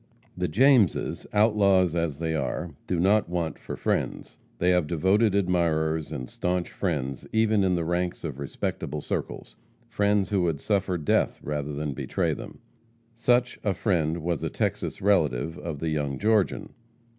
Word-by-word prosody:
The - - -1
Jameses, 120 - +3
outlaws 100 -5 +4
as 85 -4 -1
they 80 0 -2
are, 80 +3 -2 0.2
do 90 - 0
not 100 +1 +3
want 85 -2 -2
for - - -6
friends. - - -2 0.2
They 90 +1 +2
have 90 -4 +2
devoted 95 +6 +2
admirers 80 -5 +1
and 65 - -5
staunch 90 +4 -2
friends 70 -8 -3
even 110 -2 +3
in 95 -1 +2
the 85 -2 -1
ranks 90 +1 -1
of 75 -5 -5
respectable 70 +1 -4
circles - - -5 0.3
persons 100 -1 +1
who 100 -2 +2
would 85 -4 0
suffer 95 -2 0
death 75 - +1
rather 75 0 -3
than 75 0 -3
betray - - -1
them. - - -9 0.5
Such 120 +1 +1
a 100 -3 0
friend 85 -4 0
was 85 -2 -1
a - - -1
Texas - - -2
relative 80 -7 +2
of 80 -3 -5
the 80 +3 -2
young 75 -3 -1
Georgian. 105 -2 +1
85 Hz, 155 wpm, -26 LUFS, 80-100 Hz, 0.5 s, outlaws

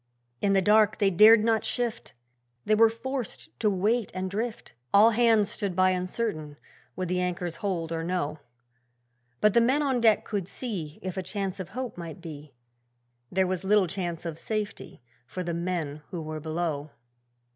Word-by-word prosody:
In 200 - +2
the 195 -1 +3
dark 215 +1 +4
they 200 -2 +3
dared 215 +4 +7
not 225 -1 +2
shift! 240 - -2 0.5
They 215 - +2
were 225 +1 +6
forced 255 +2 -5
to 215 - +3
wait 210 +4 0
and 185 0 -3
drift; 225 +3 -4 0.2
All 215 +3 +7
hands 225 -3 +3
stood 195 -3 -3
by 185 0 +4
uncertain 180 -5 -3 0.4
would 185 -1 -3
the 180 +1 0
anchors 175 -2 -3
hold 170 -5 -2
or 165 0 -2
no. 165 -4 -2 1.0
But 210 -1 +4
the 235 - +5
men 265 +6 +2
on 265 -4 +1
deck 220 -2 +4
could 200 -5 -3
see 185 - -5
If 185 0 -5
a - - 0
chance 195 +1 -4
of 180 -2 -6
hope 255 -8 -4
might 170 +1 -7
be 150 -5 -10 0.8
There 190 0 +2
was 185 0 -2
little 205 0 +4
chance 175 -1 -4
of 165 -1 -5
safety 210 - -4 0.2
for 185 - -5
the 170 -1 -3
men 170 -4 -3
who 170 -3 -5
were 155 0 -5
below. 155 -2 -3
190 Hz, 175 wpm, -27 LUFS, 170-215 Hz, 1.0 s, dared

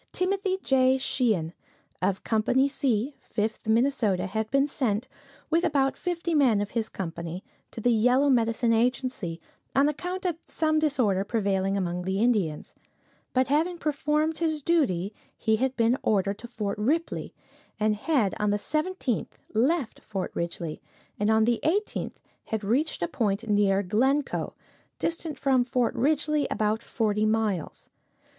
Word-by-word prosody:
Timothy 380 +1 0
J. 260 0 +4
Sheehan, 220 - 0 0.5
of 190 +1 0
Company 240 +5 +2
"C," 270 -2 0
Fifth 215 0 -3
Minnesota, 220 -5 +2
had 220 +3 -2
been 275 +2 +3
sent, 250 -4 -1 0.4
with 335 +2 +3
about 280 -5 +2
fifty 340 -1 -2
men 260 -9 +4
of 205 0 -3
his 225 -2 -2
company, 170 0 -5 0.3
to - - -9
the 245 +2 +2
Yellow 250 +5 +4
Medicine 230 -2 +2
Agency, 235 -7 0 0.4
on 275 +2 +5
account 360 +5 -3
of 340 -3 -1
some 310 -1 +1
disorder 250 -11 +2
prevailing 200 -2 0
among 180 -2 -2
the 190 +2 -2
Indians; 205 -10 0 0.6
but 255 0 +1
having 325 +5 +1
performed 300 +1 0
his 315 -3 -1
duty, 220 - +1 0.2
he 220 -1 +2
had 260 +2 -1
been 230 +1 +3
ordered 200 -1 +1
to 240 - -8
Fort 210 -4 -4
Ripley, 310 +10 -1 0.4
and 215 0 +2
had 225 -3 +1
on 210 - +1
the 205 - +2
17th 305 - -2 0.2
left 260 +3 +1
Fort 195 -3 -5
Ridgley, 170 -2 -4 0.4
and 210 +1 +1
on 220 0 +4
the 240 0 +2
18th 405 +7 -1 0.3
had 220 -1 -3
reached 250 - 0
a - - +1
point 210 +1 -1
near 205 -1 +3
Glencoe, 265 +9 0 0.4
distant 330 -2 -3
from 265 -2 +3
Fort 245 -1 0
Ridgley 300 +2 +1
about 215 +1 0
forty 215 -2 0
miles. 215 -6 -1
235 Hz, 145 wpm, -27 LUFS, 205-285 Hz, 0.6 s, on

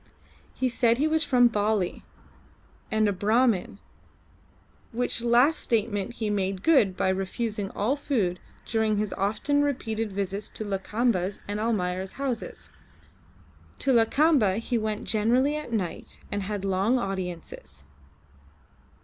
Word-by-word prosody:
He 260 - 0
said 235 -1 +2
he 295 +4 +2
was 315 0 +2
from 245 -4 +5
Bali, 210 -4 0 0.9
and 220 -1 +2
a 205 - +1
Brahmin, 210 0 +1 1.1
which 240 0 -1
last 245 +6 +4
statement 215 -2 -1
he 225 -2 -3
made 195 -2 -1
good 220 - +4
by 190 - +1
refusing 195 +2 -2
all 230 +7 +1
food 220 -12 -1 0.3
during 220 -2 +1
his 210 -1 -1
often 220 +9 0
repeated 225 -6 -2
visits 200 +1 -3
to 215 - -5
Lakamba's 200 -1 -1
and 205 +1 -3
Almayer's 190 -4 -1
houses. 265 -4 -5 1.1
To 270 - +1
Lakamba 235 - +3
he 230 +2 -2
went 215 -2 -1
generally 245 +7 +2
at 300 -5 -5
night 195 -7 -3
and 205 - -1
had 200 0 -4
long 195 +6 +2
audiences. 180 - -5
215 Hz, 125 wpm, -26 LUFS, 195-245 Hz, 1.1 s, from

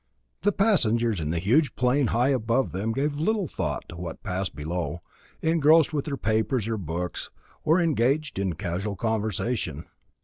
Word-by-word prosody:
The 205 - +3
passengers 120 - +2
in 75 -1 -2
the 85 - 0
huge 120 - +2
plane 125 +1 +2
high 120 +4 +2
above 125 0 +1
them 100 +5 -2
gave 145 +4 -1
little 205 +4 +1
thought - - -3
to - - -8
what 85 -1 -7
passed 95 -1 -3
below, 85 +1 -3 0.4
engrossed 160 -1 +4
with 145 -2 -1
their 140 -3 -3
papers 110 +1 0
or 115 -1 -1
books, 85 0 -4 0.3
or 160 +4 +4
engaged 150 - +1
in 95 -3 0
casual 95 +4 -3
conversation. 110 - -2
115 Hz, 160 wpm, -26 LUFS, 95-145 Hz, 0.4 s, engrossed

